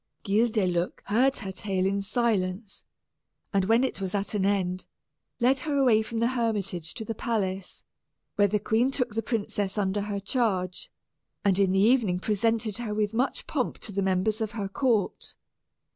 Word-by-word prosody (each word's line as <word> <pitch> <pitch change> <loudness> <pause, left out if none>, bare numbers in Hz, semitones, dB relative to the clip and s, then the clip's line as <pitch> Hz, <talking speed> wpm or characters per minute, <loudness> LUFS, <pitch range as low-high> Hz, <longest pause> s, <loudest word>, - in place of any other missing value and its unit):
Guildeluec 195 -5 +1
heard 260 +6 +3
her 195 -4 -4
tale 190 -1 -1
in 200 +1 +1
silence, 205 -2 -1 0.7
and 195 -1 +2
when 225 +5 +4
it 260 - -2
was 190 0 -2
at 200 +1 -2
an 195 -2 +1
end, 185 -2 -1 0.5
led 260 +3 +3
her 290 +1 -1
away 245 -6 +4
from 225 +1 -5
the 230 +1 +2
hermitage 205 -9 -2
to 220 - -5
the 225 - -3
palace, 195 -5 -3 0.5
where 205 0 +4
the 210 +2 +1
queen 225 +5 +1
took 250 -5 -1
the 225 - 0
princess 205 -3 -2
under 200 0 0
her 200 0 -3
charge, 195 -4 -1 0.6
and 195 -1 +3
in 195 -2 +3
the 190 - +2
evening 215 -4 +3
presented 215 +2 0
her 215 -3 -3
with 210 0 0
much 250 +4 -1
pomp 265 -5 -2
to 215 - -8
the 200 0 -1
members 195 +4 +1
of 220 0 -2
her 205 -3 -3
court. 220 0 0
210 Hz, 175 wpm, -27 LUFS, 195-230 Hz, 0.7 s, when